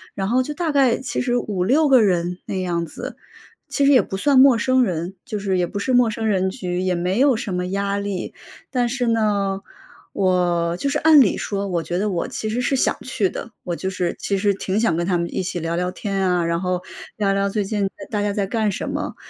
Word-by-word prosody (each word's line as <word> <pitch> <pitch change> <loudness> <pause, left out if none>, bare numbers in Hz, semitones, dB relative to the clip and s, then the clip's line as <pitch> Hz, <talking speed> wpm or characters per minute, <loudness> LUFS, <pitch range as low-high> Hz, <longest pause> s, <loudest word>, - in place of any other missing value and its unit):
然 195 -1 -2
后 250 +4 +2
就 295 - -5
大 335 -1 -1
概 270 -5 +3
其 260 - -3
实 245 -1 +1
5-6 235 - +1
个 265 -3 +6
人 180 -3 +1
那 - - -4
样 175 -2 -1
子， 160 - -8 0.5
其 280 - +1
实 280 - +5
也 260 - +6
不 - - -6
算 275 +6 +4
陌 265 -2 +7
生 255 +2 +3
人， 180 -2 -3
就 220 -6 -4
是 195 -2 0
也 175 -1 +1
不 200 - -6
是 260 - -1
陌 245 -2 +5
生 220 +1 -4
人 190 -3 +1
局， 180 -4 -4
也 185 -1 0
没 180 +5 -1
有 275 -1 +5
什 215 -3 -4
么 180 0 -2
压 200 +1 -1
力， 200 -2 -4 0.4
但 245 -2 +1
是 245 0 -1
呢， 205 -4 +1 0.5
我 175 -3 +1
就 280 - -1
是 290 - 0
按 315 -1 +7
理 235 -8 +4
说， 200 -1 -3
我 175 -3 -1
觉 175 - -3
得 210 +3 0
我 175 -4 -2
其 220 - -4
实 235 +3 -1
是 260 +2 +1
想 - - +1
去 220 -7 -1
的， 230 - -7
我 175 -2 -3
就 190 - -3
是 180 -2 -2
其 200 - -1
实 200 +1 +2
挺 195 +1 -2
想 225 -7 +2
跟 170 +1 -1
他 180 -1 +1
们 170 0 -1
一 - - 0
起 180 -1 -3
聊 165 0 -2
聊 180 +1 -1
天 195 +1 -4
啊， 175 -1 +1
然 170 +1 -1
后 180 -1 -1 0.4
聊 200 -2 +1
聊 200 0 +1
最 205 +1 -1
近 200 -1 -1 0.2
大 210 -2 -1
家 205 0 0
在 200 -1 -1
干 215 0 0
什 195 - -4
么。 - - -4
200 Hz, 260 characters per minute, -21 LUFS, 180-235 Hz, 0.5 s, 陌